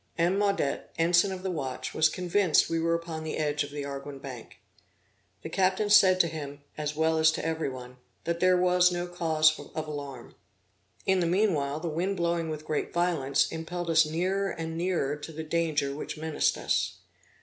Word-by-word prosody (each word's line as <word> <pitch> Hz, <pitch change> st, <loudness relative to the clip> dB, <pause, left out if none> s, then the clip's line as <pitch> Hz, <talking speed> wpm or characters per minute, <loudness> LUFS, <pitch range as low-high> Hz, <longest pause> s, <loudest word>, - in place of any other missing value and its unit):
M. 175 Hz, +3 st, +2 dB
Maudet, 200 Hz, -9 st, 0 dB
ensign 175 Hz, +4 st, +3 dB
of 185 Hz, -1 st, -6 dB
the 190 Hz, -, -1 dB
watch, 135 Hz, -6 st, -4 dB
was 155 Hz, 0 st, +4 dB
convinced 180 Hz, -2 st, +2 dB
we 165 Hz, -, +1 dB
were 165 Hz, +1 st, +1 dB
upon 165 Hz, -1 st, -5 dB
the 160 Hz, -, -4 dB
edge 150 Hz, -1 st, 0 dB
of 145 Hz, -, -7 dB
the 145 Hz, -1 st, -5 dB
Arguin 140 Hz, 0 st, -6 dB
Bank. 130 Hz, -4 st, -9 dB, 0.9 s
The -, -, -5 dB
captain 190 Hz, +4 st, +1 dB
said 185 Hz, -3 st, +7 dB
to 170 Hz, -, +1 dB
him, 145 Hz, -3 st, -7 dB
as 150 Hz, -1 st, -3 dB
well 160 Hz, +1 st, +2 dB
as 160 Hz, 0 st, +6 dB
to -, -, -4 dB
every 160 Hz, -2 st, -1 dB
one, 125 Hz, -1 st, -9 dB, 0.3 s
that 170 Hz, 0 st, -2 dB
there 185 Hz, 0 st, +4 dB
was 180 Hz, 0 st, +4 dB
no 175 Hz, 0 st, -2 dB
cause 160 Hz, -3 st, +2 dB
of 155 Hz, -1 st, -6 dB
alarm. 140 Hz, -5 st, -7 dB, 0.7 s
In 190 Hz, -1 st, +3 dB
the 170 Hz, -, +1 dB
meanwhile, 165 Hz, -7 st, +1 dB
the 170 Hz, -, -4 dB
wind 180 Hz, +5 st, -1 dB
blowing 170 Hz, -1 st, 0 dB
with 155 Hz, 0 st, -5 dB
great 155 Hz, -1 st, -2 dB
violence, 165 Hz, -6 st, +1 dB
impelled 170 Hz, +1 st, -4 dB
us 165 Hz, 0 st, +6 dB
nearer 185 Hz, +6 st, -1 dB
and 165 Hz, -2 st, -5 dB
nearer 170 Hz, -5 st, 0 dB
to 150 Hz, +2 st, -8 dB
the 160 Hz, 0 st, -6 dB
danger 155 Hz, -3 st, 0 dB
which 150 Hz, -, -6 dB
menaced 160 Hz, 0 st, 0 dB
us. -, -, -1 dB
160 Hz, 190 wpm, -28 LUFS, 150-175 Hz, 0.9 s, said